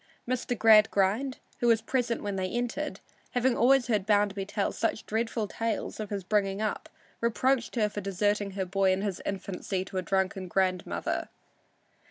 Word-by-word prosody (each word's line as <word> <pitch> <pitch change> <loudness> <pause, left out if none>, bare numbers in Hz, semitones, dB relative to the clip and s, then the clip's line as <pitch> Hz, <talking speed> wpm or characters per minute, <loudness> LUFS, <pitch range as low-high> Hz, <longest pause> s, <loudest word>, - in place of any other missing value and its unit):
Mr. 250 -1 -1
Gradgrind, 215 +3 +4 0.2
who 240 - +1
was 230 -1 +5
present 245 -3 -1
when 205 -1 -2
they 190 -1 -1
entered, 245 +7 -3 0.3
having 250 0 +2
always 260 +1 +4
heard 210 -5 0
Bounderby 205 -2 +2
tell 205 -1 -1
such 225 - -2
dreadful 225 0 -1
tales 225 +2 -3
of 215 -2 -4
his 200 -2 -3
bringing 195 0 +1
up, 215 -1 -2 0.3
reproached 235 +2 +1
her 215 -3 +3
for 205 0 -5
deserting 200 +1 0
her 190 - 0
boy 195 +1 +2
in 190 +1 0
his 200 -4 -3
infancy 190 -1 -3
to 190 - -6
a - - -1
drunken 190 +1 -1
grandmother. 185 -1 -1
210 Hz, 165 wpm, -29 LUFS, 195-235 Hz, 0.3 s, was